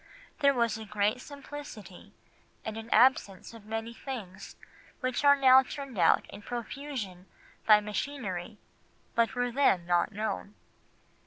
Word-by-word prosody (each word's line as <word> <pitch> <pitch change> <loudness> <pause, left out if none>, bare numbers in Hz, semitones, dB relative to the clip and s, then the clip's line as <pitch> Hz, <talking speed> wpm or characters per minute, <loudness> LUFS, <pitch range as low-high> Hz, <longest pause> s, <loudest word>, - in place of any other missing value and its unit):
There 280 -2 +4
was 235 -2 +1
a 220 - -7
great 210 +3 0
simplicity, 285 -9 -10 0.5
and 220 - -4
an 225 +1 -8
absence 230 -5 +3
of 225 -3 -13
many 225 +1 -4
things 215 -7 -8 0.4
which 255 +1 -2
are 285 0 +7
now 265 -1 +7
turned 265 -4 -7
out 165 - +4
in 205 - -10
profusion 235 -5 -6 0.4
by 210 -1 +7
machinery 210 -3 -4 0.6
but 230 +1 +1
were 245 0 0
then 230 -9 +2
not 175 +1 +2
known. 210 -1 -4
225 Hz, 135 wpm, -29 LUFS, 205-265 Hz, 0.6 s, are